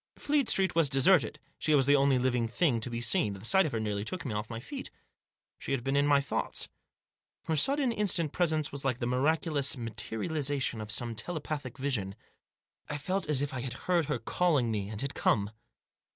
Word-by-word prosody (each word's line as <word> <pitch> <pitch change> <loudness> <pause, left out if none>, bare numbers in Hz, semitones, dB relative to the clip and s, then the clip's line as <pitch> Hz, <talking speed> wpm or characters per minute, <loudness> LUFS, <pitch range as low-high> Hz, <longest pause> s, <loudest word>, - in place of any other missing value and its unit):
Fleet 290 -4 +1
Street 190 -1 +3
was 165 -4 +3
deserted; 135 - +3 0.2
she 155 - +2
was 135 -2 +4
the 145 +1 +5
only 140 -1 +3
living 125 -2 +1
thing 120 +1 +1
to 110 - -1
be 120 0 -4
seen; 110 -3 +1
the 100 +2 -10
sight 190 +7 +5
of - - -5
her 115 - -2
nearly 105 -2 -2
took 155 +7 -5
me 125 - -3
off 105 0 -4
my 115 -1 -5
feet. 270 - -6 0.7
She - - -3
had 130 -3 -1
been 135 +1 -1
in 140 +1 +3
my 145 -1 +5
thoughts. 140 - -3 0.7
Her 160 - -1
sudden, 270 - +2
instant 185 -8 +1
presence 155 -4 0
was 140 -1 -3
like 130 -3 0
the 120 - -3
miraculous 140 +3 +1
materialisation 120 - -2
of 105 - -7
some 115 +2 -1
telepathic 145 +1 -5
vision. 120 -9 -2 0.7
I 145 - -2
felt 185 +4 -2
as 145 -2 +3
if 145 - -4
I 130 - -3
had 125 -1 -4
heard 175 -3 +2
her 150 +1 -1
calling 150 -10 +1
me, 100 -2 -2
and 105 -1 -6
had 140 - -3
come. 100 -1 +1
140 Hz, 205 wpm, -30 LUFS, 115-160 Hz, 0.7 s, the